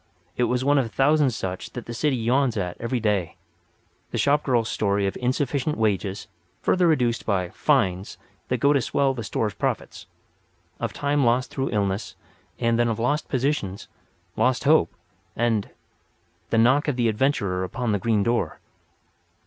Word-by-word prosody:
It 125 - +2
was 125 +1 0
one 145 0 +4
of 130 - +1
a - - -11
thousand 145 +5 +3
such 95 -6 -5
as 120 - -4
the 120 - -7
city 145 +3 +1
yawns 125 +1 +1
at 90 -3 -2
every 120 +2 -1
day—the 105 -6 -5
shop 145 +1 +3
girl's 120 -5 +1
story 100 -1 0
of 95 - -2
insufficient 135 +3 -1
wages, 105 -2 -1 0.3
further 180 -1 +2
reduced 125 -7 +1
by 95 -4 0
"fines" 100 -5 0 0.3
that 125 - 0
go 140 +5 +3
to 140 - +2
swell 135 +3 +1
the 120 -3 -5
store's 110 -1 -2
profits; - - -3 0.7
of - - -2
time 145 0 0
lost 125 +2 +2
through 135 0 -2
illness; 100 -1 -2 0.4
and 115 -1 +1
then 120 - +3
of 115 -2 -1
lost 125 +6 0
positions, 130 -8 -1 0.5
lost 130 -1 +1
hope, 145 - +4 0.4
and—the 115 0 -4
knock 130 +7 +4
of 145 - 0
the 120 -2 +1
adventurer 105 -6 0
upon 120 +5 -2
the 105 - +1
green 110 0 +1
door. 120 +2 -1
120 Hz, 160 wpm, -24 LUFS, 105-135 Hz, 0.7 s, one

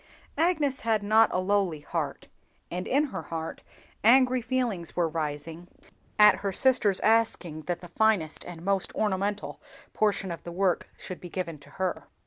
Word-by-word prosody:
Agnes 310 -5 +2
had 220 -2 0
not 220 +2 +5
a - - 0
lowly 185 -5 0
heart, - - -4 0.4
and 180 +1 -3
in 280 +3 +3
her - - -3
heart 165 -1 -6 0.4
angry 255 +2 +5
feelings 235 -8 -2
were 175 -2 +2
rising 160 +2 -4 0.5
at 210 0 +7
her 200 -1 -2
sister's 220 -4 +2
asking 215 -8 +1
that 175 -1 -2
the 175 - -9
finest 210 -8 +1
and 175 -1 -9
most 195 -1 0
ornamental 205 0 -1 0.3
portion 205 -3 +1
of 170 - -6
the 170 - -7
work 180 0 0
should 185 - -8
be 175 - -8
given 165 -4 -4
to 145 - -17
her. 185 -1 -2
195 Hz, 160 wpm, -27 LUFS, 170-220 Hz, 0.5 s, at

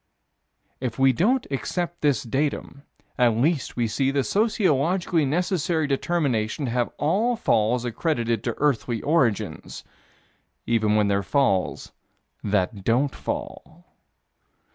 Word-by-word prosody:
If 125 -3 -4
we 135 0 +4
don't 240 - +1
accept 175 +7 -3
this 145 -6 +2
datum, 140 +2 -2 0.4
at 120 -3 +3
least 145 +4 0
we 120 -2 0
see 135 +5 0
the 140 0 +1
sociologically 180 - +1
necessary 170 +1 0
determination 140 -4 -1
to 120 - -2
have 120 0 0
all 210 - +1
falls 120 - +1
accredited 120 -3 -1
to - - -1
earthly 125 -5 0
origins 135 - 0 0.8
even 110 -2 +2
when 105 -1 +3
they're 100 0 +1
falls 100 -5 0 0.5
that 100 -1 -1
don't 130 +6 +1
fall. 290 - -6
135 Hz, 120 wpm, -24 LUFS, 115-170 Hz, 0.8 s, we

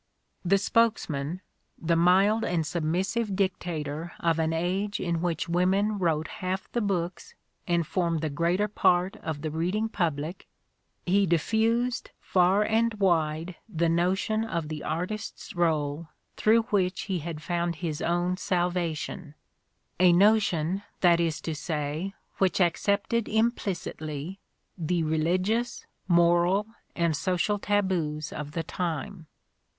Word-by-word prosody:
' - - -48
' - - -45
The - - +7
spokesman, 185 -7 0 0.4
the 170 0 +1
mild 190 +6 +4
and 165 -3 0
submissive 190 +7 -1
dictator 170 -4 -2
of 165 -1 +1
an 160 0 +1
age 185 +5 -1
in 170 -2 -1
which 170 -2 -1
women 190 +4 +1
Wrote 160 -3 +1
half 185 +1 -3
the 240 - 0
books 180 -4 -2 0.3
and 170 -2 +1
formed 170 -1 0
the 155 -2 -2
greater 170 +7 +1
part 185 -2 +2
of 155 -2 -5
the 155 - -2
reading 180 +8 -1
public, 165 -4 -2 0.6
he 195 +2 +3
diffused 225 +8 +1
far 185 +3 +3
and 225 +1 +1
wide 165 -3 0
the 170 -4 +1
notion 190 +6 +1
of 170 -8 -3
the 155 -1 -5
artist's 185 +6 -4
role 160 -2 0 0.3
through 225 +1 +4
which 185 -3 +1
he 190 -3 -2
had 160 0 -5
found 170 +2 -1
his 160 -1 -4
own 175 +1 0
salvation, 175 -3 -2 0.6
a 180 -1 +6
notion, 190 -2 +3 0.2
that 175 -2 +5
is 165 -2 0
to 160 - -3
say, 155 +4 -3 0.2
which 190 -1 +2
accepted 200 +5 +1
im 220 +2 +3
plicitly 170 - -5 0.4
the 170 +1 0
religious, 185 +9 0 0.2
moral 175 +3 +4 0.3
and 170 -3 +1
social 185 +5 0
taboos 175 -8 0
of 150 0 -6
the 165 - -2
time. 165 0 -4
175 Hz, 135 wpm, -27 LUFS, 160-195 Hz, 0.6 s, The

